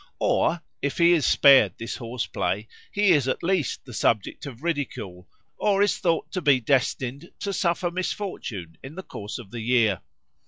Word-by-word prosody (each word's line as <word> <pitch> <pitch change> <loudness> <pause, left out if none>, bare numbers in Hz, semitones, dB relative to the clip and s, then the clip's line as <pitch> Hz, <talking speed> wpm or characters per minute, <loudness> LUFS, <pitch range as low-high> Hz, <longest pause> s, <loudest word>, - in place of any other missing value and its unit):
Or, 165 0 +1 0.2
if 140 - -2
he 170 0 +5
is 165 -5 +3
spared 130 -10 +6
this 115 +1 -5
horse 120 0 -4
play, 100 +5 -2 0.2
he 205 -2 +3
is 140 -4 +3
at 130 - -2
least 175 -7 0
the 125 - -10
subject 110 +5 0
of 130 0 -10
ridicule 120 - -4 0.3
or 200 -1 +3
is 205 - +1
thought 170 -3 0
to 185 - -2
be 145 -5 +4
destined 130 +4 -1
to 200 - -2
suffer 175 -1 0
some 175 - -1
misfortune 175 - -4
in 135 +4 -10
the 190 - -7
course 105 - -7
of 110 -6 -11
the 120 -1 -5
year. 110 -5 +2
135 Hz, 185 wpm, -25 LUFS, 115-175 Hz, 0.3 s, spared